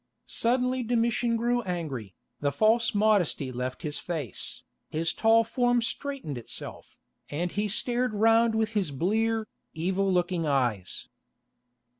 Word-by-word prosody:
Suddenly 250 Hz, +2 st, +1 dB
Domitian 235 Hz, 0 st, +1 dB
grew 240 Hz, +1 st, +1 dB
angry, 155 Hz, -, -4 dB, 0.2 s
the 145 Hz, -1 st, +1 dB
false 220 Hz, +8 st, +3 dB
modesty 205 Hz, -10 st, +2 dB
left 125 Hz, +5 st, -4 dB
his 150 Hz, -2 st, -2 dB
face, 155 Hz, -, -5 dB, 0.3 s
his 165 Hz, +1 st, -1 dB
tall 225 Hz, 0 st, +5 dB
form 245 Hz, +1 st, +2 dB
straightened 230 Hz, -, -4 dB
itself, 115 Hz, -, -8 dB, 0.3 s
and 170 Hz, +4 st, -2 dB
he 205 Hz, +1 st, 0 dB
stared 240 Hz, +3 st, 0 dB
round 225 Hz, +1 st, +4 dB
with 220 Hz, -1 st, +1 dB
his 205 Hz, -7 st, 0 dB
blear, 220 Hz, +9 st, 0 dB, 0.3 s
evil 190 Hz, +4 st, 0 dB
looking 175 Hz, -2 st, +1 dB
eyes. 120 Hz, -10 st, 0 dB
210 Hz, 125 wpm, -28 LUFS, 155-230 Hz, 0.3 s, tall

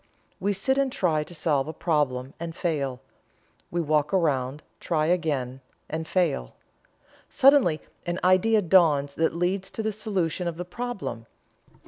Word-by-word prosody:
We 200 Hz, +2 st, 0 dB
sit 265 Hz, +8 st, +1 dB
and 275 Hz, -1 st, +1 dB
try 160 Hz, -9 st, +1 dB
to 175 Hz, -, -11 dB
solve 150 Hz, -3 st, +1 dB
a 160 Hz, -, -5 dB
problem, 140 Hz, -6 st, -1 dB
and 165 Hz, -1 st, -5 dB
fail. 140 Hz, -7 st, -2 dB, 0.7 s
We 175 Hz, -, -1 dB
walk 150 Hz, -1 st, +1 dB
around, 145 Hz, -5 st, 0 dB, 0.2 s
try 155 Hz, -2 st, 0 dB
again, 145 Hz, -7 st, -1 dB, 0.3 s
and 160 Hz, +1 st, -4 dB
fail. 160 Hz, -, 0 dB, 0.7 s
Suddenly 260 Hz, -, +4 dB, 0.3 s
an 175 Hz, +1 st, -1 dB
idea 200 Hz, +4 st, +4 dB
dawns 155 Hz, -6 st, +4 dB
that 160 Hz, +1 st, 0 dB
leads 185 Hz, +2 st, -1 dB
to 220 Hz, -, -5 dB
the 220 Hz, -, 0 dB
solution 190 Hz, -5 st, -2 dB
of 165 Hz, -1 st, -4 dB
the 180 Hz, -, -4 dB
problem. 185 Hz, -, -5 dB
165 Hz, 145 wpm, -26 LUFS, 150-185 Hz, 0.7 s, Suddenly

